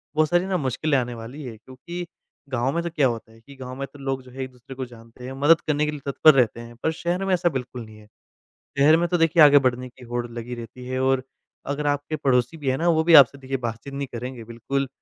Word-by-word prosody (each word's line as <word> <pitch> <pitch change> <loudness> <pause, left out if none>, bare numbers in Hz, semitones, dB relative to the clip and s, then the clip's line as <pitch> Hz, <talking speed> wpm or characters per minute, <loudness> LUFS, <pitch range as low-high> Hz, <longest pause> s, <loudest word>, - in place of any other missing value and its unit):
बहुत 155 0 +3
सारी 175 +2 +2
ना 190 -1 0
मुश्किलें 140 +1 0
आने 125 -1 -2
वाली 120 +6 -8
है। 120 -4 -7
क्योंकि 170 +10 -8 0.4
गाँव 130 0 0
में 170 - 0
तो 170 - -2
क्या 150 -5 +2
होता 115 -2 -5
है 115 - -18
कि, 140 +4 -15
गाँव 130 -1 -8
में 140 - -3
तो 145 - -13
लोग 135 -1 -3
जो 125 - -15
है 130 +1 -5
एक-दूसरे 130 0 -11
को 130 0 -4
जानते 120 0 -14
हैं, 130 - -6
मदद 145 +4 +4
करने 150 0 +2
के 150 - -1
लिए 150 - -6
तत्पर 145 +2 +5
रहते 120 -3 +2
हैं, 120 0 -10
पर 160 - +2
शहर 175 +4 -2
में 190 - +1
ऐसा 175 -1 +2
बिल्कुल 125 -4 -5
नहीं 110 0 -14
है। 105 - -17 0.7
शहर 150 +3 +6
में 175 - +1
तो 175 +1 +1
देखिए 165 0 +4
आगे 145 -1 +8
बढ़ने 125 0 0
की 125 +1 -17
होड़ 120 0 -3
लगी 120 +1 -6
रहती 120 +2 -9
है 130 +1 -3
और 130 -1 +2 0.5
अगर 145 +1 -3
आपके 145 +2 -1
पड़ोसी 125 +1 +1
भी 145 -4 -2
है 130 - +1
ना, 170 - 0
वो 160 -1 +3
भी 170 +1 +4
आपसे 140 -2 +8
देखिए 135 0 -4
बातचीत 120 +3 -6
नहीं 140 0 -3
करेंगे 120 0 -6
बिल्कुल, 120 +5 -3
135 Hz, 260 wpm, -24 LUFS, 125-150 Hz, 0.7 s, आगे